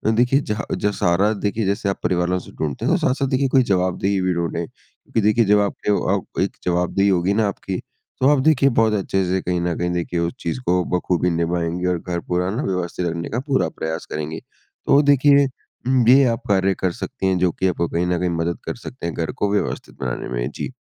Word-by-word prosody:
देखिए 125 +4 +3
जह 105 -3 -3
जो 105 - 0
सहारा 95 +2 +2
देखिए 105 +1 -2
जैसे 100 +1 0
आप 95 - -3
परिवार 90 -1 +1
वालों 90 0 +1
से - - -13
ढूँढते 75 -4 -4
हैं, - - +3
तो - - +2
साथ-साथ 135 +1 0
देखिए 135 +1 +1
कोई 130 0 +4
जवाबदेही 95 -1 0
भी 90 0 +1
ढूँढें, 85 0 -2
क्योंकि 115 - -6
देखिए 110 +3 +3
जब 105 +1 +4
आपके 100 0 -1
अ, 100 - 0
एक - - -3
जवाबदेही 90 +3 +1
होगी 95 +1 +2
ना 110 0 +2
आपकी, 95 -1 -4 0.4
तो 130 - +5
आप 145 -1 +4
देखिए 140 -3 +4
बहुत 110 -1 +3
अच्छे 95 -1 0
से 95 +1 0
कहीं 90 -1 -1
ना 85 -1 -1
कहीं 90 +1 -1
देखिए 85 0 -2
उस 85 0 -1
चीज़ 85 +9 -3
को 90 0 +2
बख़ूबी 90 0 0
निभाएँगे 85 +1 -1
और 90 -1 0
घर 85 0 -3
पूरा 90 +1 0
ना 120 +7 -2
व्यवस्थित 90 -1 -2
रखने 85 0 -3
का 120 - -2
पूरा 135 -2 +1
प्रयास 80 +1 -5
करेंगे। 75 +1 -4 0.5
तो 140 - +6
देखिए 140 0 +5
उ, 130 -1 -2
ये 135 +2 +7
आप 115 -1 -2
कार्य 95 -1 +3
कर 95 - +1
सकती 95 - -4
हैं, 95 -1 +2
जो 90 -1 +2
की 95 - -1
आपको 85 -1 0
कहीं 85 +1 0
ना 90 -1 0
कहीं 90 0 0
मदद 85 0 -2
कर - - -3
सकते 120 -3 -9
हैं 85 - -3
घर 80 -1 -2
को 100 - -1
व्यवस्थित 105 - -2
बनाने 60 -2 -3
में, - - -2
जी। - - -5
95 Hz, 225 wpm, -21 LUFS, 85-110 Hz, 0.5 s, ये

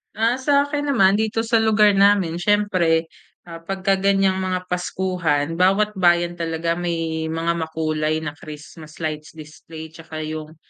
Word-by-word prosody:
Ah, 230 +4 +1
sa 280 +1 +3
akin 290 0 -3
naman, 195 -1 +4
dito 220 +1 -1
sa 230 0 +2
lugar 215 -1 +4
namin 195 -4 +3
siyempre, 175 -5 +1 0.3
ah, 165 -1 -10
pagka 195 +3 -1
ganyang 195 -1 +2
mga 185 -1 -2
paskuhan, 180 -4 -1
bawat 195 +3 +3
bayan 175 -1 +2
talaga 165 0 -2
may 165 -2 -2
mga 165 +1 -1
makulay 160 -1 -2
na 150 - -3
Christmas 155 +1 -12
lights 155 0 -5
display 160 +1 -11
tsaka 160 -1 -8
yung 155 0 -7
170 Hz, 145 wpm, -21 LUFS, 160-195 Hz, 0.3 s, naman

